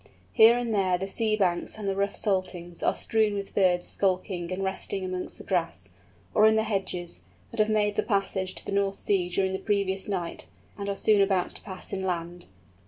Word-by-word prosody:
Here 230 +2 +7
and 240 -2 -1
there 190 -3 +2
the 190 +2 -4
sea 215 +2 +1
banks 180 -3 0
and 210 -2 -5
the 195 - 0
rough 200 +1 0
saltings 185 -3 -2
are - - +2
strewn 220 -2 +1
with 200 -1 -5
birds 180 -3 +3
skulking 185 -2 -1
and 185 +1 -2
resting 190 0 -2
amongst 185 0 -4
the - - -10
grass, 165 - -2 0.4
or 215 0 +6
in 220 - +4
the 220 - +3
hedges, 185 - -3 0.3
that - - -7
have 215 0 +4
made 210 -1 +1
the - - +4
passage 195 -3 -1
of - - -19
the - - -4
North 200 0 +1
Sea 185 -3 0
during 190 +1 0
the 190 - -2
previous 195 -2 0
night, 180 -4 -3 0.3
and 200 -1 -4
are 200 - -1
soon 210 +1 +4
about 195 -2 +2
to - - -11
pass 190 -3 -9
inland. 175 -2 -3
195 Hz, 205 wpm, -27 LUFS, 180-205 Hz, 0.4 s, Here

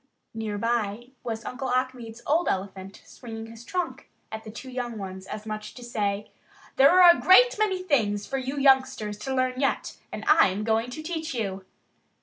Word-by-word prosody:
Near 220 -2 -4
by 230 +1 -1
was 225 -2 -4
Uncle 260 +1 -4
Achmed's 250 -2 -2
old 325 +4 +2
elephant, 190 0 -4
swinging 225 -2 -9
his 225 +1 -12
trunk 355 +4 -4 0.2
at 220 0 -6
the 220 - -9
two 255 +4 -9
young 245 -2 -4
ones 190 -1 -7
as 215 0 -7
much 215 -1 -5
as - - -11
to 245 - -10
say: 205 -3 -2 0.5
"There 275 +1 +8
are 350 -1 +9
a - - -6
great - - +7
many 380 -4 +1
things 210 - +1
for 270 - -2
you 265 +2 -4
youngsters 260 -6 +2
to 265 +5 -3
learn 255 0 0
yet, 275 - -1
and - - -6
I'm 210 - +4
going 225 +2 +1
to 310 +5 -7
teach 320 -3 -4
you." 195 -4 -3
240 Hz, 185 wpm, -26 LUFS, 210-270 Hz, 0.5 s, are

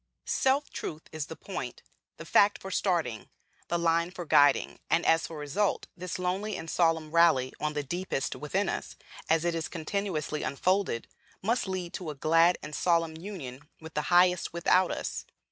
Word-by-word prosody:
Self 270 +2 +1
truth 155 0 -5
is 155 -2 -4
the 160 - -7
point, 135 -12 -6 0.3
the - - -9
fact 205 0 +4
for 190 - -7
starting, 170 - 0 0.4
the 170 - 0
line 170 0 +2
for 180 -1 -7
guiding; 145 -2 +4
and 165 - +2
as 165 0 +3
for 165 - -8
result, 150 +8 0
this 180 0 -5
lonely 190 +4 -2
and 165 - -7
solemn 165 -3 +2
rally 160 -6 +4
on 150 0 -1
the 145 -1 -2
deepest 170 -2 -2
within 190 +7 -1
us, - - -4 0.3
as 160 +1 +3
it 175 - +1
is 165 -1 -2
continuously 165 -3 -3
unfolded, 175 0 0 0.4
must 230 +1 +1
lead 185 -2 -4
to 175 -4 -5
a 150 - -5
glad 165 +5 +4
and 150 - -7
solemn 165 -1 +1
union 155 -6 -8
with 160 0 -10
the 150 0 -2
Highest 180 0 +4
without 180 +1 +3
us. - - -3
170 Hz, 175 wpm, -29 LUFS, 155-185 Hz, 0.4 s, fact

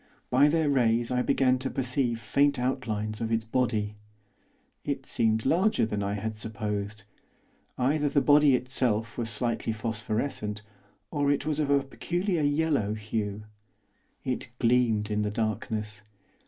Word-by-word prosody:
By 135 +4 +6
their 160 0 +2
rays 120 -3 +2
I 125 0 +2
began 130 -1 +2
to 130 +1 -3
perceive 125 -2 0
faint 140 +6 +2
outlines 115 -4 -2
of 115 0 -2
its 110 -1 0
body. 110 -3 0 0.9
It 140 -2 -3
seemed 110 -3 +1
larger 180 - +3
than 105 -2 -2
I 100 0 -1
had 110 +2 -3
supposed. 105 -1 -4 0.7
Either 145 +3 +1
the 140 - +3
body 145 -1 +5
itself 120 -3 -1
was 115 -2 -3
slightly 115 0 -1
phosphorescent, 110 0 -3 0.5
or 145 -1 +1
it 145 0 0
was 155 -1 -1
of 150 -2 0
a 140 -1 +3
peculiar 175 +5 -2
yellow 145 -7 +1
hue. 105 -1 -3 0.8
It 130 -1 -3
gleamed 115 -3 +2
in 105 0 +1
the 105 - 0
darkness. 105 0 -3
120 Hz, 140 wpm, -28 LUFS, 110-140 Hz, 0.9 s, By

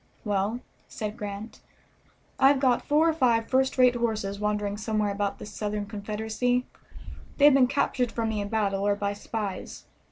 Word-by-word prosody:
"Well," 205 +3 -1 0.3
said 215 -1 -5
Grant, 205 0 -7 0.8
"I 270 - +7
have 275 0 +4
got 255 -3 +2
four 305 +3 +4
or 325 - +3
five 235 -7 +2
first 265 +1 +1
rate 250 -1 +6
horses 215 -4 -2
wandering 210 -1 -1
somewhere 215 -1 -1
about 200 0 -2
the - - -9
Southern 210 0 -4
Confederacy. 220 +4 -2 0.7
They 285 - +5
have 295 - +8
been 265 -2 +5
captured 250 -2 0
from 225 -1 -2
me 215 -2 -2
in 200 - -3
battle 200 -3 0
or 205 - +3
by 200 0 -2
spies. 205 -1 -5
220 Hz, 170 wpm, -27 LUFS, 205-250 Hz, 0.8 s, have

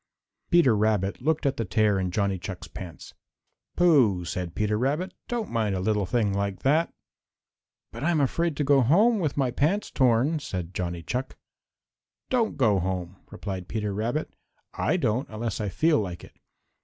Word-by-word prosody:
Peter 170 -10 +5
Rabbit 105 -1 0
looked 155 +3 0
at 135 -1 +1
the 115 - 0
tear 105 0 +2
in 95 -1 -1
Johnny 100 0 0
Chuck's 90 0 -7
pants. 90 -3 -9 0.6
"Pooh!" 125 - +4
said 90 0 -4
Peter 105 0 0
Rabbit, 145 - -1
"don't 235 -4 -3
mind 110 -4 0
a - - -2
little 105 0 0
thing 110 -4 +1
like 100 -1 -2
that." 155 +5 +2 1.0
"But - - -7
I'm 165 -1 +2
afraid 150 +3 0
to 150 - +1
go 140 -1 +4
home 205 - +4
with 155 -6 -1
my 130 -3 +1
pants 160 +11 0
torn," 130 +5 +2
said 90 - -5
Johnny 85 -2 -3
Chuck. 125 +7 -4 0.9
"Don't 240 -4 +1
go 110 -8 +3
home," 90 0 -3
replied 95 -3 -6
Peter 105 -2 -2
Rabbit. 115 +9 -2 0.4
"I - - 0
don't 120 +6 0
unless 110 0 -3
I 105 - -1
feel 155 - +2
like 90 -4 -5
it. - - -14
110 Hz, 170 wpm, -26 LUFS, 95-145 Hz, 1.0 s, Peter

